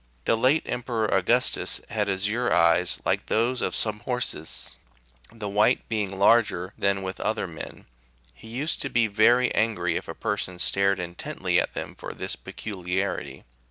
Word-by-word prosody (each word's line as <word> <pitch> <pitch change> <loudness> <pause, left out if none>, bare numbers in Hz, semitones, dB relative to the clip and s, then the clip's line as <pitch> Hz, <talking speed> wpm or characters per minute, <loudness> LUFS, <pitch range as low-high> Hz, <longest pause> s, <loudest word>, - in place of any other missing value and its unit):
The - - +3
late 130 +7 +3
Emperor 120 -2 -2
Augustus 115 +7 +2
had 105 -2 0
azure 105 +6 0
eyes 85 +1 +4
like - - 0
those 120 +3 +1
of - - -1
some 105 -1 +1
horses, 125 -10 -4 0.5
the 110 -2 -6
white 105 +5 +2
being 105 -4 -2
larger 100 -3 +3
than 100 -1 0
with 95 0 -5
other 110 0 -1
men; 85 -4 -9 0.5
he 60 - -14
used 135 +8 -2
to 135 - -2
be 120 -3 +3
very 120 +4 +4
angr} 100 -6 +1
if - - -3
a - - -6
person 95 -3 -3
stared 100 +2 +2
intently 85 -1 -1
at - - -2
them - - -5
for - - -8
this - - -4
peculiarity. 95 -1 -4
105 Hz, 160 wpm, -26 LUFS, 95-115 Hz, 0.5 s, eyes